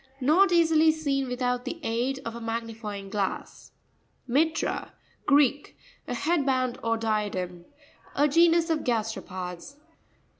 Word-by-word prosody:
Not 330 +9 +4
easily 325 -2 +5
seen 280 -4 -1
with 250 +1 -4
out 245 0 0
the 335 - -5
aid 250 +4 -1
of 230 - -4
a 235 - -7
magnifying 225 -3 -5
glass. 200 -3 -4 0.6
Mi'rra.—Greek. 285 -1 0 0.3
A 245 - -3
head 315 +4 +1
band, 255 -2 0
or 230 0 +1
diadem. 205 -6 -2 0.5
A 290 +2 +4
genus 335 +2 +4
of 320 - +1
gasteropods. 215 -2 -4
250 Hz, 120 wpm, -27 LUFS, 225-305 Hz, 0.6 s, easily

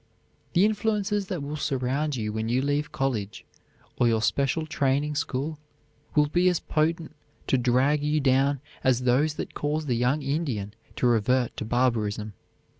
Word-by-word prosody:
The 185 +2 +5
influences 210 -1 0
that 180 -7 -3
will 145 +2 -4
surround 140 +1 -1
you 105 -3 -3
when 110 +1 -2
you 125 +3 +1
leave 145 +1 -1
college 115 -7 -2 0.5
or 120 - +4
your 110 -1 +2
special 140 +5 +1
training 145 0 0
school 145 0 -3 0.6
will 150 -1 +5
be 175 +5 +3
as 180 - 0
potent 160 0 -1 0.3
to - - +2
drag 130 +4 +2
you 150 +1 +1
down 135 0 +2 0.2
as 130 -1 +3
those 135 +5 +2
that - - -5
cause 150 +1 -2
the 125 -4 0
young 125 +5 +1
Indian 135 -9 -2 0.2
to - - -1
revert 120 +1 +2
to - - -3
barbarism. 110 -3 0
140 Hz, 160 wpm, -26 LUFS, 125-155 Hz, 0.6 s, The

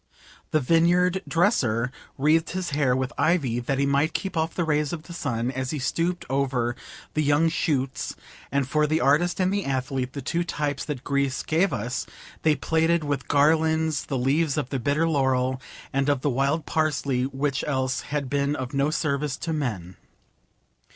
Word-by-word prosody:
The 155 - +2
vineyard 175 +5 +3
dresser 125 - +2 0.3
wreathed 155 +3 +3
his 185 -3 -3
hair 140 -3 +2
with 130 0 -2
ivy 140 -9 +2
that 130 +3 -1
he 140 - +2
might 140 +3 +2
keep 190 -2 -2
off 160 0 -1
the 175 - 0
rays 150 -2 +1
of 160 -3 -5
the 170 - -10
sun 125 -7 -2
as 130 -1 -3
he 155 - -2
stooped 170 +6 -1
over 130 -3 0 0.4
the 155 - +1
young 150 +2 +3
shoots, 140 -5 -1 0.4
and 140 -1 +1
for 150 +2 +2
the 155 +2 +1
artist 160 +7 +2
and 185 +1 +2
the 200 -1 0
athlete, 130 -1 -2
the 140 - -5
two 170 +5 0
types 145 -4 -2
that 140 -4 -5
Greece 140 -1 0
gave 170 +5 +2
us, 120 +4 -3 0.3
they 155 -1 +3
plaited 160 +3 +1
with 145 -1 -2
garlands 160 +1 +2
the 135 - -1
leaves 140 +4 +1
of 140 -4 -1
the 135 - -1
bitter 145 +6 +1
laurel 130 -3 +1 0.3
and 135 +1 +1
of 140 -3 +1
the 145 - +1
wild 140 +4 0
parsley, 140 -5 0
which 140 +2 -1
else 130 -3 0
had 145 -2 -3
been 140 +2 0
of 130 -1 -5
no 140 +1 +2
service 145 -3 -1
to 165 - -3
men. 105 - -3
145 Hz, 180 wpm, -25 LUFS, 130-160 Hz, 0.4 s, vineyard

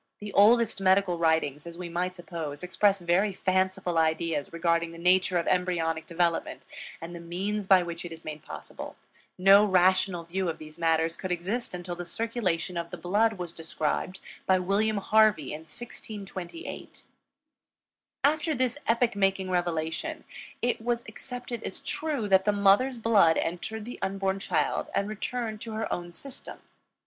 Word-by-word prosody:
The 205 -1 -7
oldest 225 0 +5
medical 190 -2 +3
writings, 160 -2 +1
as 170 0 -9
we 180 -1 -5
might 180 +2 -2
suppose, 165 -4 -6
express 195 +2 +2
very 185 +4 +2
fanciful 185 -2 +1
ideas 160 -2 0
regarding 170 0 +1
the - - -10
nature 180 +1 +3
of 170 - 0
embryonic 165 -3 0
development 170 -1 -1 0.3
and 165 +1 -7
the 170 - -7
means 190 +4 -3
by 190 -2 +6
which 170 -1 -6
it 175 - -7
is 165 0 -10
made 155 -1 -6
possible; - - -8 0.4
no 195 +2 +7
rational 185 -2 +3
view 180 +2 -2
of 160 - -3
these 155 +1 -12
matters 165 0 +2
could 185 - -5
exist 185 +5 -2
until 175 0 -5
the 175 0 -7
circulation 185 -4 -2
of 170 0 -3
the - - -7
blood 210 +5 +2
was 175 -4 -6
described 165 +3 -2 0.3
by 190 - +5
William 200 +4 +1
Harvey 210 -7 +3
in 150 - -5
1628. 200 - -8 1.2
After 305 +2 +2
this 255 +2 0
epoch 235 -1 +2
making 195 -1 +1
revelation, 175 - -2 0.4
it 245 -1 +1
was 235 0 0
accepted 245 +1 -7
as - - -5
true 295 -7 -2
that 190 -1 +4
the 210 - +4
mother's 205 +6 +4
blood 210 -8 +4
entered 210 +6 -3
the 245 - -8
unborn 195 0 -1
child - - 0
and 200 - +1
returned 220 +1 -4
to 225 -1 -6
her 220 +1 -2
own 175 0 -5
system. 270 +9 -9
185 Hz, 160 wpm, -28 LUFS, 170-215 Hz, 1.2 s, no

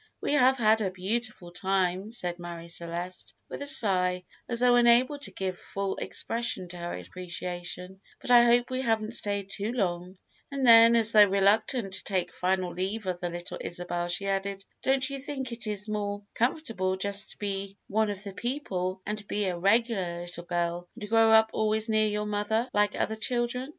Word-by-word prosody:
"We - - -1
have 265 -2 +4
had 220 -2 +3
a 195 - 0
beautiful 190 0 -4
time," 190 +1 0
said 180 -7 -2
Marie 170 -1 -8
Celeste, 175 +1 -5
with - - -7
a 285 - -2
sigh, 185 -10 +4 0.3
as 235 0 0
though 250 0 +5
unable 245 +4 +4
to - - -4
give 185 -2 -4
full 195 -1 -3
expression 230 -5 -1
to 180 - -9
her 175 - -5
appreciation; 180 - -6 0.2
"but - - -4
I 240 -1 +8
hope 240 +1 +3
we 255 0 -1
haven't 225 -3 0
stayed 200 -3 -2
too 205 +3 -2
long;" 180 -5 -2 0.3
and 275 -2 -2
then, 230 0 +8
as 225 -1 +4
though 210 -2 +8
reluctant 200 +2 +2
to 190 - -4
take 185 -3 -2
final 185 -1 -1
leave 195 +4 -3
of 180 -1 -2
the 175 - -3
little 175 0 -7
Isabel, 175 0 -3
she 175 +3 -1
added: 195 0 -2 0.2
"Don't 265 0 +2
you 275 -1 -5
think 265 -2 -5
it 230 -2 -5
is 210 0 -3
more 205 -1 -3
comfortable 225 -7 -1
just 200 +1 -2
to - - -24
be 200 -1 -4
one 220 +1 +1
of 200 -1 -5
the 200 -2 -7
people, 190 -7 -3
and 210 0 -5
be 205 0 -1
a 185 -2 -1
regular 195 -2 +1
little 175 0 -8
girl, 175 0 -2
and 210 - -6
grow 225 +1 +4
up 220 0 +6
always 220 +1 0
near 215 0 +3
your 210 0 -2
mother, 210 +3 0
like 205 0 +2
other 220 - 0
children?" 240 +3 -1
205 Hz, 190 wpm, -28 LUFS, 180-230 Hz, 0.3 s, I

